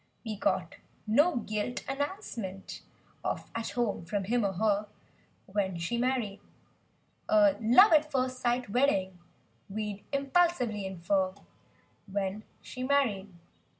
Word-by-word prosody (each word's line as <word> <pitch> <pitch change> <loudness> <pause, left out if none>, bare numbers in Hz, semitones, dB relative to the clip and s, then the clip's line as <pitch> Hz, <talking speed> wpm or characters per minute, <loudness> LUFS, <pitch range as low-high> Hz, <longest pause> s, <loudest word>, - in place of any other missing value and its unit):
We 220 -1 -3
got 200 - -1 0.3
no 290 +11 +4
gilt 215 +2 -3
announcement 270 - -4 0.4
of - - -3
"At 230 0 -3
Home" 230 -7 0
from 195 +4 -2
him 235 +4 +1
or 195 -1 0
her— 210 +1 +1 0.6
When 190 -2 -1
she 175 +8 -2
married. 245 -5 0 0.9
"A 310 -2 +5
love 250 - +7
at! 305 0 +4
first 255 -2 0
sight 245 0 0
wedding" 195 -8 +1 0.5
we'd 210 0 -4
impulsively 275 - +1
infer— 190 +1 0 0.7
When 195 +1 -3 0.2
she 255 - -8
married. 255 -8 +1
220 Hz, 115 wpm, -30 LUFS, 195-265 Hz, 0.9 s, love